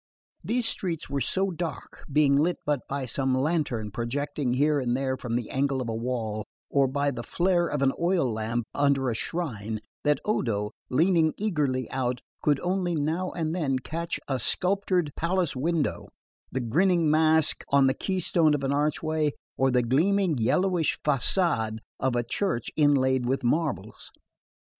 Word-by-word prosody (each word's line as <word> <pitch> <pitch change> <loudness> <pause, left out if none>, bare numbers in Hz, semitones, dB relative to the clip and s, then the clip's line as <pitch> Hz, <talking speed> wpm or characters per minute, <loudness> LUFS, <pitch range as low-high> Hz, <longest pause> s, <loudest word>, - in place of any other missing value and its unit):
These 240 0 +1
streets 170 -7 -3
were 140 -1 -1
so 190 +9 +1
dark, 170 -1 -6
being 140 -1 +4
lit 160 +5 +2
but 145 -2 +1
by 140 -1 -2
some 130 +1 0
lantern 130 -7 -1
projecting 130 +4 -2
here 145 +3 +2
and 125 -1 0
there 130 -1 -1
from 120 -3 -4
the 120 -2 -3
angle 135 0 0
of 125 - -3
a 115 - -2
wall, 110 -2 -3 0.3
or 140 -1 +3
by 140 +2 0
the 120 - -5
flare 175 +5 +1
of 145 -3 -1
an 135 - +3
oil 170 -9 +1
lamp 110 +2 -2
under 140 -3 +2
a - - -1
shrine, 110 - -3 0.2
that 150 -2 +2
Odo, 105 - -1 0.2
leaning 160 +3 +3
eagerly 150 -11 -1
out, 125 -2 -1 0.2
could 145 -2 +2
only 180 -1 0
now 160 +5 -1
and 160 -2 -2
then 145 -7 0
catch 165 +6 -4
a 135 -2 -1
sculptured 180 - +1
palace 175 -2 0
window, 155 +3 -1 0.4
the 130 - -2
grinning 165 +6 +2
mask 160 0 +3
on 140 -1 +5
the 130 - +3
keystone 170 -4 +1
of 140 - -4
an 135 - 0
archway, 150 +1 0 0.2
or 135 0 +2
the 125 -1 +2
gleaming 170 +8 +2
yellowish 165 - +1
facade 135 - +2 0.2
of 130 -2 0
a 120 - +1
church 175 - -1
inlaid 130 -4 +3
with 135 +1 0
marbles. 150 +5 -2
145 Hz, 160 wpm, -27 LUFS, 130-170 Hz, 0.4 s, on